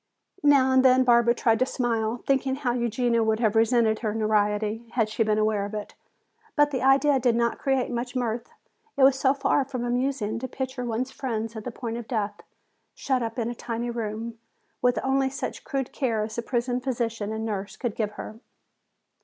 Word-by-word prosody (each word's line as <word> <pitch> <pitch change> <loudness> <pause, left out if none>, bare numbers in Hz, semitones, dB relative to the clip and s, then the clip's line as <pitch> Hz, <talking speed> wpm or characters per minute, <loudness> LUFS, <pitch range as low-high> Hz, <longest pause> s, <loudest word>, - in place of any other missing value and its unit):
Now 275 -3 +5
and 260 0 +5
then 260 0 +6
Barbara 235 -1 +4
tried 225 -2 +2
to 255 - +3
smile, 230 -2 -1
thinking 270 -1 +1
how 265 -3 -1
Eugenia 240 0 +1
would 220 0 +1
have 220 -2 +1
resented 225 -1 +3
her 215 -2 -2
notoriety 215 +1 0
had 225 -3 +1
she 215 - -3
been 215 -1 +2
aware 215 -1 +1
of 205 +1 -5
it. 210 -1 -6 0.6
But 295 -1 +4
the 260 - -2
idea 270 +1 +4
did 240 -2 +2
not 235 0 0
create 270 -2 0
much 245 +1 -3
mirth. 240 -1 -2 0.5
It 275 - +4
was 265 0 +5
so 270 +1 +3
far 275 0 +2
from 255 -2 -4
amusing 245 -3 -1
to 260 - -4
picture 260 0 -4
one's 240 +3 -2
friend 225 -4 -4
at 220 - -6
the 250 - -3
point 230 -1 -5
of 235 -2 -7
death, 210 -4 -2 0.5
shut 260 -2 0
up 230 0 -4
in 230 -2 -1
a 240 - -3
tiny 235 0 -4
room, 225 0 -4 0.4
with 245 0 +2
only 265 0 +2
such 270 - -5
crude 270 -2 -3
care 230 -5 0
as 215 0 -5
the 235 - -2
prison 245 +1 -1
physician 230 -5 -2
and 220 0 -3
nurse 200 -2 -4
could 240 -5 -3
give 210 -2 -2
her. 215 +1 -8
235 Hz, 200 wpm, -26 LUFS, 220-260 Hz, 0.6 s, then